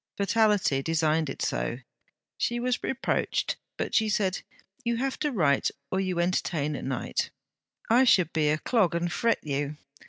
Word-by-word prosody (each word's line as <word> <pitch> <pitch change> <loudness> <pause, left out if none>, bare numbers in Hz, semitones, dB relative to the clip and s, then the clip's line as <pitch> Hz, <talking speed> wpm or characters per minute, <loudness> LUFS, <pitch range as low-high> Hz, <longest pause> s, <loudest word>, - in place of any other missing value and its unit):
Fatality 205 -8 +2
designed 160 0 +1
it - - -4
so. 120 - -1 0.6
She 240 0 -1
was 250 0 0
reproached, 265 - -1 0.2
but - - -3
she 220 -1 +3
said: 195 -3 0 0.4
'You 235 -1 0
have 265 +2 -2
to 300 -1 0
write 155 - +2 0.2
or 190 - +1
you 185 -2 -1
entertain 170 -4 0
at - - -6
night; 130 -2 -2 0.6
I 240 +3 +5
should 180 -9 +4
be 155 -2 +2
a 155 - +2
clog 195 -1 +1
and 170 0 -1
fret 230 0 +1
you. 145 0 -2
180 Hz, 160 wpm, -27 LUFS, 155-230 Hz, 0.6 s, I